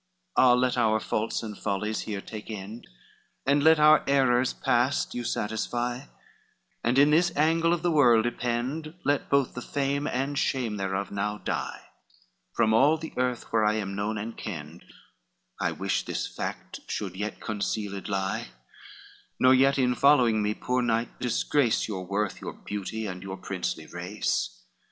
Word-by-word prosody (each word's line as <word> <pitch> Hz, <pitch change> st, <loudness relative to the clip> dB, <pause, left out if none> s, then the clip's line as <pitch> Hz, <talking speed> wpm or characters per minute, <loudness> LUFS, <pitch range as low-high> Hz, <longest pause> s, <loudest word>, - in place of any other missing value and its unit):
LIV -, -, +5 dB
"Ah, 125 Hz, -1 st, +7 dB
let 125 Hz, 0 st, +2 dB
our 110 Hz, -1 st, +3 dB
faults 110 Hz, +1 st, -2 dB
and 105 Hz, -2 st, -6 dB
follies 105 Hz, +2 st, -2 dB
here 105 Hz, -2 st, -4 dB
take 110 Hz, +1 st, -9 dB
end, 105 Hz, +2 st, -7 dB, 0.6 s
And 140 Hz, +1 st, +3 dB
let 160 Hz, +1 st, +7 dB
our 155 Hz, 0 st, +6 dB
errors 130 Hz, -2 st, +3 dB
past 120 Hz, +4 st, +1 dB
you 120 Hz, -, -3 dB
satisfy, 120 Hz, +3 st, -2 dB, 0.8 s
And 120 Hz, +3 st, +1 dB
in 145 Hz, +2 st, +6 dB
this 175 Hz, +3 st, +4 dB
angle 165 Hz, +3 st, +3 dB
of 175 Hz, 0 st, 0 dB
the 175 Hz, -, +2 dB
world 120 Hz, -7 st, +5 dB
ypend, 125 Hz, +7 st, -2 dB
Let 145 Hz, 0 st, +1 dB
both 140 Hz, -2 st, +2 dB
the 125 Hz, -, -6 dB
fame 140 Hz, +2 st, -1 dB
and 140 Hz, +3 st, -1 dB
shame 120 Hz, -6 st, -1 dB
thereof 95 Hz, 0 st, -2 dB
now 105 Hz, +1 st, -2 dB
die, -, -, -4 dB, 0.7 s
From 110 Hz, -2 st, +3 dB
all 145 Hz, +8 st, +5 dB
the 160 Hz, +1 st, -8 dB
earth 125 Hz, -2 st, -2 dB
where 110 Hz, -1 st, +3 dB
I 105 Hz, 0 st, +3 dB
am 100 Hz, -2 st, -3 dB
known 105 Hz, +2 st, -2 dB
and 110 Hz, +2 st, -5 dB
kenned, 80 Hz, -3 st, -7 dB, 0.7 s
I -, -, 0 dB
wish -, -, -1 dB
this -, -, -3 dB
fact -, -, -6 dB
should 100 Hz, -4 st, -3 dB
still 105 Hz, +3 st, -3 dB
concealed 105 Hz, -2 st, -3 dB
lie: 95 Hz, -1 st, -2 dB, 0.9 s
Nor 130 Hz, 0 st, +6 dB
yet 135 Hz, +2 st, +4 dB
in 125 Hz, -2 st, +2 dB
following 125 Hz, -5 st, +4 dB
me, 105 Hz, +1 st, 0 dB
poor 125 Hz, 0 st, -1 dB
knight, 115 Hz, -1 st, -1 dB
disgrace 125 Hz, +1 st, +1 dB
Your 95 Hz, -4 st, -5 dB
worth, 100 Hz, 0 st, -2 dB
your -, -, -5 dB
beauty, 105 Hz, +2 st, -5 dB
and 90 Hz, -3 st, -5 dB
your 95 Hz, 0 st, -6 dB
princely 90 Hz, -4 st, -4 dB
race. 85 Hz, -, -3 dB
115 Hz, 165 wpm, -27 LUFS, 105-135 Hz, 0.9 s, Ah